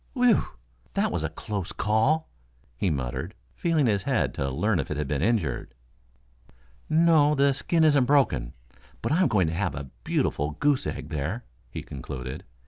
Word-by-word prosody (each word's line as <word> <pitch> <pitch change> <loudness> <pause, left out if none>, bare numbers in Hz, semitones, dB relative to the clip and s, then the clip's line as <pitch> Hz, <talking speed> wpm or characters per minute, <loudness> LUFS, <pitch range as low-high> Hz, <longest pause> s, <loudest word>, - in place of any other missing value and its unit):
"Whew! 245 -4 +4 0.5
That - - +1
was 85 -3 -2
a 80 - -1
close 100 +3 -5
call," 110 +9 +1 0.5
he 90 +10 0
muttered, 65 -6 -3 0.2
feeling 165 -4 +1
his 105 -4 +2
head - - 0
to 70 - -2
learn 100 +8 +1
if 70 - -3
it - - -3
had 75 -2 -2
been 70 0 -1
injured. 85 - 0 1.1
"No; 155 -2 +5
the 140 0 +4
skin 160 +4 +1
isn't 145 -4 +5
broken, 120 - +2 0.5
but - - -1
I'm 180 +4 +4
going 95 -5 +2
to 80 - -2
have 85 -4 -1
a 70 -2 -7
beautiful 75 +4 0
goose 145 -2 +2
egg 75 - -5
there," 80 - -3 0.2
he - - -6
concluded. 65 -1 -7
105 Hz, 165 wpm, -26 LUFS, -, 1.1 s, No